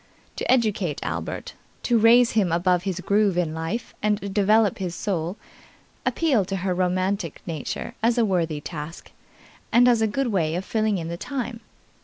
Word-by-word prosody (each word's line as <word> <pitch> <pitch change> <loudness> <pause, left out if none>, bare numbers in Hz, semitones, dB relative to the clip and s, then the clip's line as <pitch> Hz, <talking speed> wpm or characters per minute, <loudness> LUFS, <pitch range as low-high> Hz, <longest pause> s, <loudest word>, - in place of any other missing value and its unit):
To - - 0
educate 210 - +1
Albert, - - -4 0.3
to 235 -2 +3
raise 235 +2 +6
him 200 -6 +2
above 175 +1 +2
his 185 -2 -2
groove 200 -1 +2
in 165 -3 0
life 165 +9 -4
and 205 -2 -1
develop 210 0 +3
his 180 -2 -3
soul, 180 0 -2 0.7
appealed 260 - +2
to 195 - -2
her 185 - +1
romantic 185 -1 -1
nature 160 -4 -4
as 230 +2 +2
a 235 - +4
worthy 165 -6 0
task, 155 +1 -8 0.6
and 245 +1 +6
as 235 -2 +4
a 220 - +3
good 265 +4 -1
way 165 -5 0
of 185 +2 -3
filling 215 -2 0
in 165 -2 -4
the 170 - -4
time. 245 0 -4
195 Hz, 170 wpm, -24 LUFS, 175-225 Hz, 0.7 s, raise